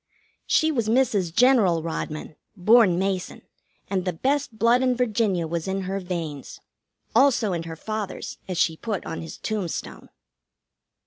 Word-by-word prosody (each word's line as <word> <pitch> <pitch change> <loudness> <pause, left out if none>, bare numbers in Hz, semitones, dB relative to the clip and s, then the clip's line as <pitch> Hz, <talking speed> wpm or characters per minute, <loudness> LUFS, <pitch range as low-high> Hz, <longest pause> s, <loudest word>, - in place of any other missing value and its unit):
She 315 0 +3
was 235 -7 -1
Mrs. 220 -8 +2
General 210 -7 +4
Rodman, 155 -1 -5 0.2
born 210 -1 +5
Mason, 190 -1 -2 0.4
and 190 -2 -1
the 180 - -1
best 265 - -1
blood 235 +3 +4
in 255 -1 +2
Virginia 215 -7 +1
was 165 +1 -3
in 190 0 -1
her 190 +1 -3
veins. 170 -6 -5 0.5
Also 235 -5 +3
in 170 - -2
her 160 - -6
father's, 215 +3 -5
as 185 -2 -4
she 165 -1 +2
put 210 -3 -4
on 160 - -5
his 165 - -8
tombstone. 205 -6 -4
195 Hz, 145 wpm, -24 LUFS, 170-235 Hz, 0.5 s, born